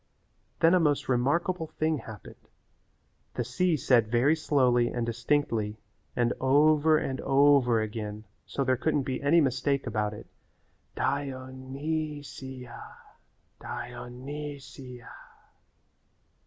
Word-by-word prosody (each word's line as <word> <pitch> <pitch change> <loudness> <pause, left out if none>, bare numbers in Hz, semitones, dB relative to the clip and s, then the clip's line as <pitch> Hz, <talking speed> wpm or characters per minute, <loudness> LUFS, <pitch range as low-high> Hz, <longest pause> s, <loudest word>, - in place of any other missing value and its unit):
Then 165 +1 +6
a 185 - +5
most 150 -4 +1
remarkable 160 +7 +1
thing 155 -1 -1
happened. 110 -5 -12 0.9
The 120 - -1
sea 155 +8 +1
said 120 -4 +3
very 125 +7 +3
slowly 125 -6 +2
and 120 -1 -2
distinctly 115 -3 0 0.4
and 120 0 +2
over 150 +3 +4
and 130 -3 -3
over 135 -4 +4
again 105 -1 -5 0.2
so 140 - -1
there 130 -1 +2
couldn't 145 +2 +1
be 130 -1 -3
any 155 +4 +4
mistake 135 +1 0
about 105 -1 -1
it, - - -10 0.7
"Di 140 0 0
o 130 0 -8
ny 145 +3 -4
si 130 -2 -9
a, 120 - -10 0.8
Di - - -6
o - - -8
ny 145 +4 -6
si 130 -2 -11
a." - - -12
135 Hz, 130 wpm, -28 LUFS, 120-150 Hz, 0.9 s, Then